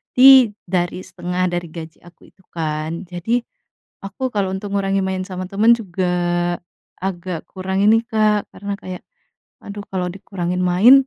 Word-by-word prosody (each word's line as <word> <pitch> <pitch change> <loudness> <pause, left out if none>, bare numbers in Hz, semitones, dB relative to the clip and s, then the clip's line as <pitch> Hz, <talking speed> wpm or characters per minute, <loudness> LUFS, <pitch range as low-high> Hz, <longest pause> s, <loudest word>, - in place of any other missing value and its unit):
di 260 -3 +9 0.2
dari 175 0 0
setengah 180 0 -2
dari 175 -1 -2
gaji 160 -1 -9
aku 175 - -18
itu 190 - -27
kan 160 +2 -3
jadi, 185 +7 0 0.6
aku 200 +7 -3
kalau 200 -3 0
untuk 200 +1 -5
ngurangin 195 -1 +1
main 190 0 -1
sama 185 -1 -5
teman 215 +4 +5
juga 185 -4 -3 1.0
agak 180 -3 -3
kurangin 190 +2 +1
nih 225 - +3
Kak 215 -1 +2
karena 200 0 -4
kayak, 185 -1 -7 0.6
aduh 205 0 -7
kalau 180 -1 0
dikurangin 185 -2 -3
main, 180 +8 +7
190 Hz, 145 wpm, -20 LUFS, 175-205 Hz, 1.0 s, di